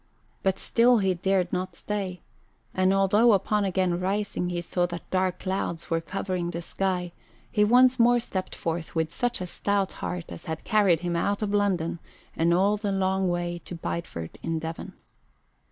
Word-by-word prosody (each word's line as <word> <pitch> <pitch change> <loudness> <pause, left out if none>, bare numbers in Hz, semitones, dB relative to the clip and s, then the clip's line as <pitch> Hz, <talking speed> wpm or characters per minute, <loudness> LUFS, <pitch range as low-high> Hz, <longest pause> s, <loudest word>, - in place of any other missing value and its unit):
But 190 0 +1
still 240 +1 +4
he 195 -3 +2
dared 185 0 0
not 185 -1 -2
stay, 195 -2 -4 0.5
and 185 0 +3
although 205 +4 +5
upon 205 +1 +1
again 185 -1 +1
arising 190 0 -1
he 175 -1 -2
saw 175 +1 0
that 175 -1 -7
dark 185 -1 +1
clouds 185 -4 -3
were 165 0 +2
covering 185 0 -3
the 170 0 -5
sky, 180 -1 -2 0.4
he 210 -3 +3
once 250 +3 +5
more 240 +1 +5
stepped 190 -5 -4
forth 165 0 -4
with 160 0 0
such 245 -5 -1
a - - -2
stout 200 +2 -1
heart 180 -1 -3
as - - -9
had 160 0 -4
carried 195 -6 +3
him 175 -1 -1
out 200 +5 0
of 205 -1 -1
London 185 -5 +1 0.4
and 165 +1 +2
all 195 +4 +3
the 205 -1 -2
long 190 -1 +1
way 175 0 -2
to 175 - -7
Bideford 160 - -5
in 165 0 -2
Devon. 160 +1 -6
185 Hz, 175 wpm, -26 LUFS, 175-200 Hz, 0.5 s, although